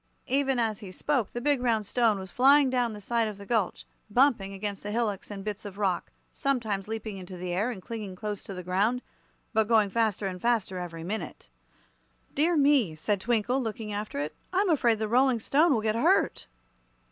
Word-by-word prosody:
Even 270 0 +1
as 225 -3 0
he 195 -3 -9
spoke 255 +2 0
the 240 - -5
big 285 0 +2
round 225 -4 +1
stone 225 -1 +2
was 190 -1 -8
flying 275 +1 +5
down 245 -3 +1
the 210 - -8
side 230 +2 0
of 210 -2 -6
the 200 - -10
gulch, 220 -4 -1 0.2
bumping 230 -4 +3
against 200 0 -4
the 205 - -6
hillocks 210 -3 -1
and 200 -2 -6
bits 210 0 -4
of 200 -2 -8
rock 195 -4 -1 0.2
sometimes 225 -9 -1
leaping 220 -2 -5
into 185 0 -8
the 175 0 -4
air 205 +7 0
and 200 -7 -6
then - - -27
clinging 215 -5 -5
close 210 +1 -5
to 195 - -7
the 180 - -6
ground, 205 +8 +1 0.5
but 220 -1 +2
going 215 -3 +3
faster 220 -3 0
and 180 -2 -4
faster 225 -6 0
every 165 -2 -6
minute. 175 - -5 0.8
"Dear 325 +4 +2
me," 275 - +3
said 195 +5 -1
Twinkle, 240 +4 +1
looking 220 -2 -4
after 210 -5 -4
it; 145 +2 -2 0.2
"I'm 375 0 +2
afraid 240 -7 +3
the 220 0 -2
Rolling 250 +1 +3
Stone 300 +9 +3
will 230 -5 +2
get 215 0 +1
hurt." 230 - +2
215 Hz, 205 wpm, -28 LUFS, 195-245 Hz, 0.8 s, flying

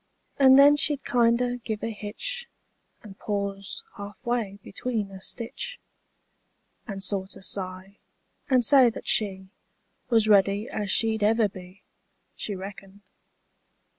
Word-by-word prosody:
And 265 -1 +7
then 285 +1 +7
she'd 290 -1 0
kinder 245 +1 +2
give 220 -3 -5
a 230 - -2
hitch, 225 - -5 0.5
And 200 -3 -12
pause 200 -1 -4
half 205 +4 -10
way 230 -5 -1
between 215 -2 -3
a 190 -1 -10
stitch. 485 - -6 1.1
And 195 -3 -6
sorter 195 0 -4
sigh, 190 +1 -5 0.5
and 255 -3 +4
say 265 -2 +6
that 225 - -9
she 190 -3 +1 0.6
Was 225 -3 +4
ready 200 +1 +3
as 205 -2 -4
she'd 220 +1 +2
ever 220 +1 +3
be. 185 0 -13 0.5
She 205 - -4
reckoned. 195 +1 -10
210 Hz, 125 wpm, -26 LUFS, 195-240 Hz, 1.1 s, And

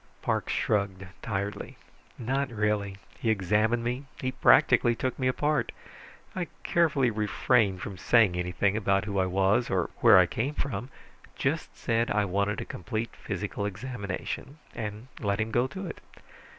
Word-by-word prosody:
Parks - - 0
shrugged 100 -2 0 0.2
tiredly. 100 -1 -4 0.4
"Not 135 +3 -1
really. 105 -3 -1 0.2
He 115 - 0
examined 110 +3 +2
me. 125 +4 -2
He 130 - -1
practically 130 -2 +5
took 130 +3 -3
me 130 - +1
apart. 150 +3 +1 0.6
I 180 -2 -2 0.2
carefully 145 -7 +2
refrained 105 -2 +1
from 95 -3 -6
saying 110 -6 +4
anything 90 +3 0
about 100 -2 +1
who 100 -2 -1
I 95 - +2
was 95 +6 +2
or 90 -3 0
where - - +7
I - - +7
came 135 +7 -2
from; 125 -2 -3 0.5
just - - -2
said 115 +1 0
I 105 0 +2
wanted 100 +2 0
a - - -5
complete 110 +6 -4
physical - - -4
examination, 105 +5 -5 0.2
and 110 +1 -6
let 100 -2 -1
him 110 0 -1
go 120 +3 +2
to 190 +8 -7
it. 170 - -7
110 Hz, 150 wpm, -28 LUFS, 100-125 Hz, 0.6 s, where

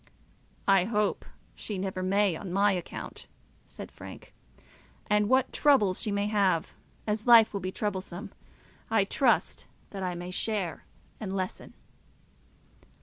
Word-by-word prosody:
"I 195 -2 +5
hope 210 -1 0 0.3
she 210 - -5
never 185 0 -3
may, 195 0 +2
on 185 +1 -7
my 200 +2 +3
account," 180 -3 -6 0.4
said - - -10
Frank. - - -11 0.7
"And 210 0 +2
what 260 0 +3
troubles 235 -11 +3
she 215 - -1
may 200 0 0
have, 200 -4 +1 0.3
as 215 +2 -2
life 230 -3 +8
will 200 - -2
be 185 0 -4
troublesome, 195 -1 -4 0.6
I 220 -2 +3
trust 240 +5 +1 0.2
that 195 - -6
I 180 -1 -2
may 175 +1 -6
share 195 -3 -2 0.3
and 195 -3 -4
lessen." 185 -1 -5
200 Hz, 135 wpm, -28 LUFS, 185-210 Hz, 0.7 s, life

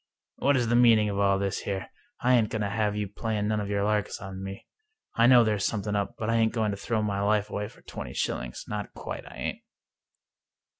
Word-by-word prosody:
"What 140 0 +3
is 120 -2 +1
the 120 - +3
meaning 115 -3 +6
of 100 0 -2
all 100 -1 +3
this 100 -1 -1
here? 95 -1 -4 0.3
I 125 +1 +4
ain't 115 -4 +4
going 110 -1 -2
to 100 - -1
have 105 0 0
you 105 -1 -2
playing 105 +1 -2
none 110 0 +1
of 100 -1 -3
your 100 -1 0
larks 105 0 0
on 95 -1 -7
me. 95 0 -7 0.5
I 115 +1 +4
know 125 -2 +8
there's 105 -3 0
something 105 -1 -2
up, 100 -1 -1
but 110 - -3
I 115 0 +2
ain't 110 -1 +2
going 110 -2 +1
to 100 - -4
throw 110 +2 -1
my 100 -1 -1
life 105 0 +1
away 105 0 -2
for - - -18
twenty - - -7
shillings— - - -3
not 105 -1 -5
quite - - -6
I - - -12
ain't." - - -4
105 Hz, 235 wpm, -27 LUFS, 100-110 Hz, 0.5 s, know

